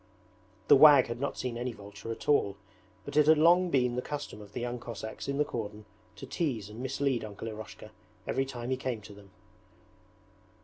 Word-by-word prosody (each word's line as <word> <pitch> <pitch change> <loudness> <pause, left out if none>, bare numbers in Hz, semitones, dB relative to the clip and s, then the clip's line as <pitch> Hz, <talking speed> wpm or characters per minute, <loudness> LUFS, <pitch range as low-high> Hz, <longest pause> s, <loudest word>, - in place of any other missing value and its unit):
The - - +8
wag 145 -4 +8
had 115 +1 -4
not 140 - -2
seen 120 -2 -3
any 125 0 -3
vulture 100 +1 -9
at 115 - -7
all, 100 -9 +2 0.5
but - - -7
it 150 0 +5
had 155 0 +7
long 175 +3 +5
been 125 -5 +2
the 125 - -1
custom 145 -6 -6
of 100 -1 -13
the - - -4
young 120 0 -3
Cossacks 110 -2 -7
in 140 0 -1
the 150 - +2
cordon 105 -5 -6 0.3
to 105 - -9
tease 120 - -3
and 110 - -10
mislead 135 -2 -1
Uncle 105 +1 -7
Eroshka 110 -1 -9 0.3
every 135 0 -1
time 120 -1 -5
he 130 - +1
came 125 -4 -3
to 105 0 -12
them. 100 -1 -15
120 Hz, 195 wpm, -30 LUFS, 110-140 Hz, 0.5 s, The